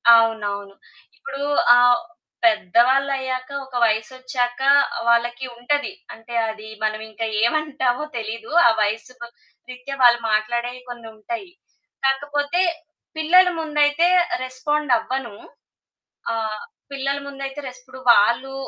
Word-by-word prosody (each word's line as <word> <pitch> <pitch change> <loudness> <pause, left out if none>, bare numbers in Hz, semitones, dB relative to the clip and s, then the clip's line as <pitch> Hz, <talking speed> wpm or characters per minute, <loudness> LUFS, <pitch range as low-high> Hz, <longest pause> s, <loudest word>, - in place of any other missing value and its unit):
అవునవును. 205 -3 0 0.4
ఇప్పుడు 275 -1 -7 0.4
ఆహ్, 245 -1 +5 0.4
పెద్దవాళ్ళయ్యాక 255 +5 +2 0.2
ఒక 265 -1 -13
వయసొచ్చాక 245 +3 -2 0.5
వాళ్ళకి 240 +2 +1
ఉంటది. 290 +8 -1 0.2
అంటే 225 +1 -12 0.2
అది 220 0 -8 0.2
మనమింకా 220 +1 -3 0.2
ఏమంటామో 270 0 0
తెలీదు. 225 +2 -6 0.2
ఆ - - +6
వయసుకు 225 +3 -3 0.4
రీత్యా 255 +2 -7
వాళ్ళు 240 -1 +6
మాట్లాడేయి 240 +3 -1
కొన్నుంటాయి. 240 - -8 0.5
కాకపోతే 290 +4 0 0.6
పిల్లల 360 +4 +5
ముందయితే 300 +1 +2 0.4
రెస్పాండవ్వను, 255 -3 -1 1.0
ఆహ్, 220 -1 -3 0.3
పిల్లల 275 0 -2
ముందయితే 275 0 -6
రెస్ 255 0 -10
ఇప్పుడు 260 +1 -13
వాళ్ళు 235 +6 +2
250 Hz, 95 wpm, -21 LUFS, 225-275 Hz, 1.0 s, ఆ